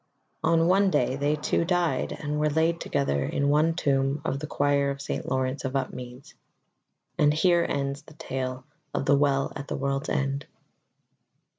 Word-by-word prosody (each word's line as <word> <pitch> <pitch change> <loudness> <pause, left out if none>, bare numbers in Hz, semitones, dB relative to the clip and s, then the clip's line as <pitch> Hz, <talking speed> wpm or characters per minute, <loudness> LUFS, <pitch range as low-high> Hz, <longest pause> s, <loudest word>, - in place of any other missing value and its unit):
On 165 0 +3
one 195 +2 +4
day 145 -5 +1
they 145 +2 +1
two 150 - 0
died 170 -6 0
and 150 0 -3
were 150 0 +2
laid 160 +2 +1
together 70 0 0
in 140 0 0
one 155 +3 +3
tomb 135 -2 +1
in 135 - -1
the 150 - -5
choir 140 -1 +1
of 140 0 -4
St. 140 - -4
Laurence 130 +1 -1
of 130 0 -3
Upmeads. 125 -1 -5 0.9
AND 150 0 +5
HERE 170 +1 +3
ENDS 140 0 -2
THE 155 - -17
TALE 130 -4 -4 0.3
OF - - -1
THE 145 0 +5
WELL 140 -1 +1
AT 140 0 -6
THE - - -3
WORLD'S 140 +2 -2
END. 140 +1 -1
140 Hz, 170 wpm, -26 LUFS, 135-155 Hz, 0.9 s, AND